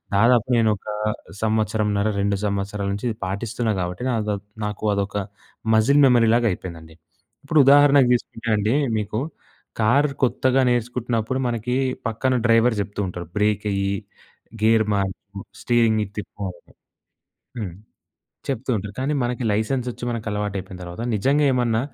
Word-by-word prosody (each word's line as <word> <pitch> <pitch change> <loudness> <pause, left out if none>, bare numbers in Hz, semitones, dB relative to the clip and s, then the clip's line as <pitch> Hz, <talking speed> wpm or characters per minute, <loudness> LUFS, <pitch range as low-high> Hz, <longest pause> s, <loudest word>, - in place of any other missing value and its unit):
దాదాపు 115 +3 +4
నేను 115 -2 +3
ఒక 95 - -18 0.6
సంవత్సరంన్నర, 110 -1 +1
2 100 0 +1
సంవత్సరాల 100 0 -2
నించి 100 +4 -5
ఇది 110 - -4
పాటిస్తున్నా 110 +4 -2
గాబట్టి, 90 +5 -3
నాదో 105 -4 0 0.3
నాకు 105 0 -5
అదొక 100 0 -2 0.6
మజిల్ 140 +7 +4
మెమరీలాగయిపోయిందండి. 110 -10 +1 0.5
ఇప్పుడు 150 +2 +2
ఉదాహరణకి 140 -1 +6
తీసుకుంటే 120 -1 -3
అండీ, 105 +5 +1 0.2
మీకు 105 +1 -2 0.6
కార్ 135 +7 +4 0.2
కొత్తగా 130 +1 +2
నేర్చుకుంటున్నప్పుడు, 120 0 -1
మనకీ 120 +1 -1 0.3
పక్కన 130 +4 0
డ్రైవర్ 115 +1 +4
జెప్తూ 100 +1 -4
ఉంటరు, 90 -1 -6
బ్రేకెయ్యి, 100 -1 0 0.7
గేర్ 110 0 +4
మార్చు, 100 0 -4 0.2
స్టీరింగిటు 110 -4 +2
తిప్పు 105 -1 -6
అని 85 -1 -21 0.9
హ్మ్. 95 -6 -5 0.7
చెప్తూంటరు, 115 -6 -2
కానీ 135 +3 0
మనకి 120 0 -2
లైసెన్సొచ్చి 120 +4 -1
మనకలవాటయిపోయిన 105 -4 -4
తరవాత, 90 +5 -7
నిజంగ 135 +8 +2
ఏమన్నా 120 -3 +1
110 Hz, 120 wpm, -22 LUFS, 100-120 Hz, 0.9 s, ఉదాహరణకి